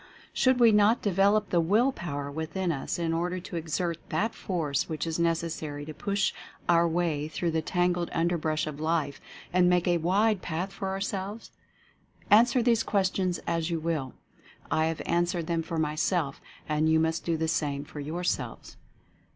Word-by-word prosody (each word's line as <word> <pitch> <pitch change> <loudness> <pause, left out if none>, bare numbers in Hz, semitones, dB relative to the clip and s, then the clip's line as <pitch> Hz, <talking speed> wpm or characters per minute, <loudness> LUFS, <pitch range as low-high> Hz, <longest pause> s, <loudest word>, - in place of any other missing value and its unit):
Should 255 -1 +3
we 235 -2 +7
not 210 +3 +4
de 205 - +1
velop 200 +2 +3
the 175 - +3
Will 215 +11 +3
Power 145 - -5
within 165 +4 -2
us, 140 -4 -3
in 165 -1 -1
order 175 +2 -1
to 180 - -8
exert 170 +1 -2
that 225 +2 0
Force 155 -7 -2
which 155 -1 -2
is 165 0 -2
necessary 160 -3 -1
to 155 - -7
push 200 +3 0 0.3
our 170 0 +4
way 165 -3 0
through 165 +2 -2
the 160 0 0
tangled 175 +1 0
underbrush 165 -2 0
of 150 -1 -6
Life 155 -3 -1 0.3
and 180 0 +5
make 180 0 +2
a 175 -1 +3
wide 195 +4 +2
path 180 +4 -3
for 195 - -4
ourselves? 195 +2 -4 0.8
Answer 235 +3 +6
these 230 -2 +3
questions 190 -3 0
as 165 0 -1
you 165 -1 -1
will. 155 -5 -2 0.6
I 155 - +2
have 165 -1 -3
answered 175 0 0
them 165 0 0
for 165 0 -4
myself, 155 0 0 0.3
and 155 +1 +1
you 160 0 +4
must 160 +1 0
do 165 -1 0
the 160 0 -1
same 145 -3 -1
for 150 - -9
yourselves. 165 +5 -3
170 Hz, 175 wpm, -28 LUFS, 160-190 Hz, 0.8 s, we